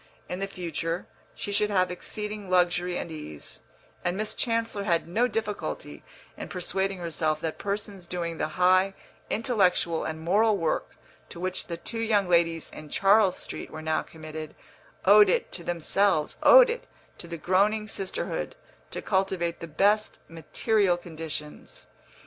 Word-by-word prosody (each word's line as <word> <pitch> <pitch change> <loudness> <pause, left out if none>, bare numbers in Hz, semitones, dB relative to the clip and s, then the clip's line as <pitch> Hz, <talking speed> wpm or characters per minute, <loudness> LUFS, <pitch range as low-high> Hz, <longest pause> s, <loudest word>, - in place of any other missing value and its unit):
In 180 - -4
the 195 - -1
future 175 -2 -3 0.3
she 205 - -5
should 210 +1 +2
have 185 -3 +2
exceeding 210 +2 -5
luxury 180 0 +2
and 170 - -5
ease, 75 - -8 0.4
and 175 +1 0
Miss 215 +1 -2
Chancellor 230 -4 -1
had 170 -4 +1
no 225 +8 +2
difficulty 220 -3 -4 0.3
in - - -7
persuading 190 +1 -2
herself 160 -3 -1
that 160 -1 -3
persons 200 -2 -4
doing 170 -2 -3
the - - 0
high 185 +2 +4 0.3
intellectual 190 -8 +2
and 160 0 -4
moral 205 +6 +3
work 165 -3 -1 0.3
to 170 - -9
which 185 +1 -2
the 170 - -4
two 225 +6 -5
young 215 -4 +2
ladies 170 -2 +2
in 155 -1 -10
Charles 195 +1 +4
Street - - -7
were 155 - -8
now 160 0 +1
committed 155 -1 -8 0.5
owed 205 +1 +8
it - - +1
to 175 - -3
themselves, 175 0 +1
owed - - +8
it 480 - -6 0.3
to 170 - -8
the 170 0 -5
groaning 205 +6 +2
sisterhood, 195 - -3 0.3
to - - -5
cultivate 190 -3 0
the 165 - -6
best 205 +7 +2
material 180 +4 +1
conditions. 160 -3 -7
185 Hz, 150 wpm, -27 LUFS, 165-205 Hz, 0.5 s, owed